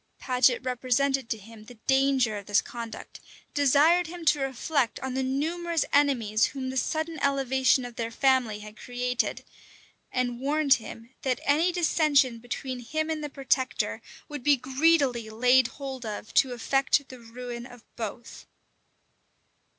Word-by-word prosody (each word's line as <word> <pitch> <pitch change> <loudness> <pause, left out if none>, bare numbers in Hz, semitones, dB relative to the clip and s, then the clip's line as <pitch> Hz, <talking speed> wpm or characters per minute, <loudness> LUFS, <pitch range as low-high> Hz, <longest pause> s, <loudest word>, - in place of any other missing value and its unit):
Paget 250 -1 +2
represented 255 +1 0
to 225 - -1
him 215 +1 -14
the 245 +1 -13
danger 265 -4 +2
of 200 - -9
this 205 +1 +4
conduct; 230 -2 -8 0.3
desired 295 +5 +4
him 340 0 -8
to 300 -1 +4
reflect 270 -1 -1
on 265 -1 -4
the 265 - -1
numerous 325 +5 -1
enemies 245 -7 +3
whom 260 -2 -5
the - - -7
sudden 315 +5 -2
elevation 265 -2 +2
of 240 -2 -10
their 230 -1 -2
family 245 -4 +1
had 210 0 -11
created; 250 +1 -2 0.7
and 245 -1 -1
warned 285 +1 +3
him, 230 0 -5
that 260 -2 -1
any 315 +5 +3
dissension 305 -8 +2
between 250 +2 -5
him 310 +6 -2
and 310 -1 -3
the 295 - -4
protector 265 -2 -1 0.3
would 295 -3 -7
be 285 +2 +4
greedily 260 -3 +2
laid 250 +3 +4
hold 265 -1 -7
of 215 0 -6
to 265 - +4
effect 270 +3 +1
the 255 - -10
ruin 240 +1 -8
of 245 -2 -15
both. 230 +1 -7
260 Hz, 150 wpm, -27 LUFS, 240-285 Hz, 0.7 s, this